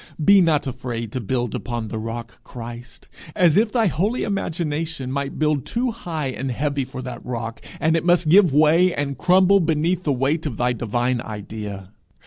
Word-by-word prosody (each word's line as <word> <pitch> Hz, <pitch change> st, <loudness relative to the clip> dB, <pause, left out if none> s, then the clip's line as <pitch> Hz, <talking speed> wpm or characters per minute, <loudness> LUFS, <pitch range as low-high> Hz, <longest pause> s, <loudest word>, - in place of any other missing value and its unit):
Be 200 Hz, -1 st, +7 dB
not 160 Hz, -4 st, +2 dB
afraid 120 Hz, -4 st, -4 dB
to 130 Hz, -, -3 dB
build 120 Hz, +1 st, -2 dB
upon 120 Hz, -3 st, -4 dB
the 110 Hz, -, -4 dB
rock 115 Hz, +1 st, -7 dB
Christ, 120 Hz, 0 st, -10 dB, 0.3 s
as 170 Hz, -4 st, +4 dB
if 215 Hz, +1 st, +3 dB
thy 235 Hz, -3 st, +2 dB
holy 200 Hz, -, 0 dB
imagination 160 Hz, -7 st, -3 dB
might 140 Hz, 0 st, -3 dB
build 150 Hz, -3 st, +1 dB
too 245 Hz, +1 st, -1 dB
high 165 Hz, -, -4 dB
and 130 Hz, +1 st, -4 dB
heavy 140 Hz, +2 st, -1 dB
for 130 Hz, 0 st, -8 dB
that 125 Hz, -2 st, -7 dB
rock, 115 Hz, -2 st, -5 dB, 0.2 s
and 160 Hz, +1 st, +2 dB
it 165 Hz, -, 0 dB
must 175 Hz, -1 st, +3 dB
give 180 Hz, +1 st, +6 dB
way 155 Hz, +5 st, +4 dB
and 140 Hz, -1 st, -2 dB
crumble 185 Hz, +6 st, +4 dB
beneath 165 Hz, +1 st, +1 dB
the 150 Hz, -, 0 dB
weight 140 Hz, +5 st, 0 dB
of 125 Hz, -, -5 dB
thy 125 Hz, 0 st, +1 dB
divine 120 Hz, +2 st, -1 dB
idea. 105 Hz, -3 st, -7 dB
140 Hz, 180 wpm, -22 LUFS, 120-170 Hz, 0.3 s, Be